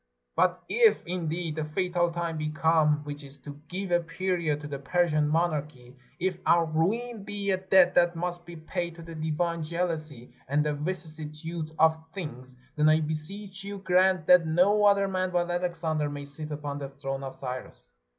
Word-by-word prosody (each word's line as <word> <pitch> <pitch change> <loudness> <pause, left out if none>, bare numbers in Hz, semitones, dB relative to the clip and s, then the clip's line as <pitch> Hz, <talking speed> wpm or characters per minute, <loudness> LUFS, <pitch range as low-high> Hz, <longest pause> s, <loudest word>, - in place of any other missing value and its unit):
But 180 0 +2
if, 465 -2 +4
indeed, 170 -2 -3
the 155 - -1
fatal 175 +2 0
time 170 -2 -3
be 155 0 -1
come, 155 -1 +3
which 145 0 -7
is 140 0 -12
to 145 0 -10
give 185 +3 -4
a 175 - +5
period 170 -3 -1
to 145 - -6
the 140 -1 -5
Persian 155 0 +2
monarchy, 150 -6 -1 0.2
if 180 0 -1
our 170 -1 +4
ruin 205 +8 -1
be 200 -1 -2
a 190 - +2
debt 185 -1 +4
that 175 0 +4
must 175 +1 -3
be 175 0 -10
paid 170 +1 -4
to 170 - -10
the 165 0 -9
divine 160 +2 -1
jealousy 155 -6 -3
and 145 +3 +1
the 150 - +1
vicissitude 155 0 -4
of 160 0 +4
things, 130 -8 -7 0.2
then 150 0 +4
I 155 0 +5
beseech 190 +6 -3
you 200 0 -5
grant 185 -2 +3
that 180 -1 +6
no 195 +6 +4
other 200 -1 +5
man 185 -1 -1
but 175 -1 0
Alexander 165 -4 -1
may 145 0 -6
sit 150 +2 -6
upon 145 -1 -4
the 140 -1 -5
throne 135 0 -5
of 135 -1 -6
Cyrus." 125 - -7
165 Hz, 180 wpm, -28 LUFS, 150-180 Hz, 0.2 s, that